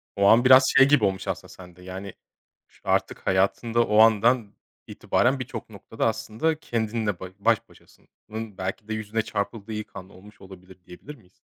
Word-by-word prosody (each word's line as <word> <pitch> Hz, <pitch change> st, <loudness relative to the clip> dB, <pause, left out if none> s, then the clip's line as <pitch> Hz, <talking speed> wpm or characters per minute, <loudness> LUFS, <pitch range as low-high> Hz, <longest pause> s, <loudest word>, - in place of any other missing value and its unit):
O 100 Hz, -, +1 dB
an 120 Hz, +4 st, +5 dB
biraz 130 Hz, +1 st, +8 dB
şey 135 Hz, -, +7 dB
gibi 140 Hz, -7 st, +4 dB
olmuş 95 Hz, 0 st, -2 dB
aslında -, -, -5 dB
sende, 90 Hz, -1 st, -14 dB
yani, 95 Hz, +1 st, -8 dB, 0.5 s
ş -, -, -27 dB
artık -, -, -1 dB
hayatında 115 Hz, +5 st, +1 dB
o 105 Hz, 0 st, +3 dB
andan 115 Hz, 0 st, +4 dB, 0.3 s
itibaren 130 Hz, +2 st, 0 dB
birçok 120 Hz, -3 st, -7 dB
noktada 110 Hz, +2 st, -4 dB
aslında 115 Hz, +8 st, -2 dB
kendinle 110 Hz, -, -2 dB
ba 95 Hz, -, -7 dB
baş 115 Hz, +1 st, +1 dB
başasın -, -, -23 dB, 0.2 s
ın 110 Hz, -2 st, -7 dB
belki 95 Hz, +3 st, -5 dB
de 110 Hz, -, -4 dB
yüzüne 110 Hz, +1 st, -2 dB
çarpıldığı 105 Hz, +1 st, -5 dB
ilk 105 Hz, -1 st, -7 dB
an 95 Hz, 0 st, -9 dB
olmuş 100 Hz, +2 st, -17 dB
olabilir, 95 Hz, -1 st, -14 dB
diyebilir 140 Hz, +12 st, -12 dB
miyiz? 95 Hz, -7 st, -24 dB
110 Hz, 175 wpm, -24 LUFS, 95-115 Hz, 0.5 s, biraz